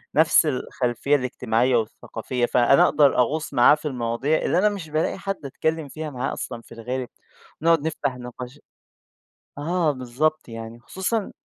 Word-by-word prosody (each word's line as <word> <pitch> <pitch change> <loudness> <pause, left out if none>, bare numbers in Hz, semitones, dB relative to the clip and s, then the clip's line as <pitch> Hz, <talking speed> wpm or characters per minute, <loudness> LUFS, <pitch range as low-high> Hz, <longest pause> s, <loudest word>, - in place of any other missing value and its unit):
نفس 160 +1 +5
الخلفيّة 130 0 0
الاجتماعيّة 125 -1 +1
والثقافية، 115 +2 -3
فأنا 125 +3 +4
أقدر 145 -4 +4
أغوص 150 +6 0
معاه 120 +5 +6
في 155 - -6
المواضيع 125 +4 0
اللي 170 - +1
أنا 210 +2 +4
مش 190 -6 -6
بالاقي 155 +4 0
حد 195 -6 -5
اتكلم 160 +2 -2
فيها 155 +2 -6
معاه 125 -3 -3
أصلًا 115 - -6
في - - -22
الغالب، 125 +2 -4 0.5
ونقعد 165 -2 +4
نفتح 135 -5 -2
نقاش 125 +3 -9 1.0
آه 165 +1 +1
بالضبط 135 +4 -1
يعني 115 0 -8
خصوصًا 190 - -3
135 Hz, 145 wpm, -24 LUFS, 120-155 Hz, 1.0 s, معاه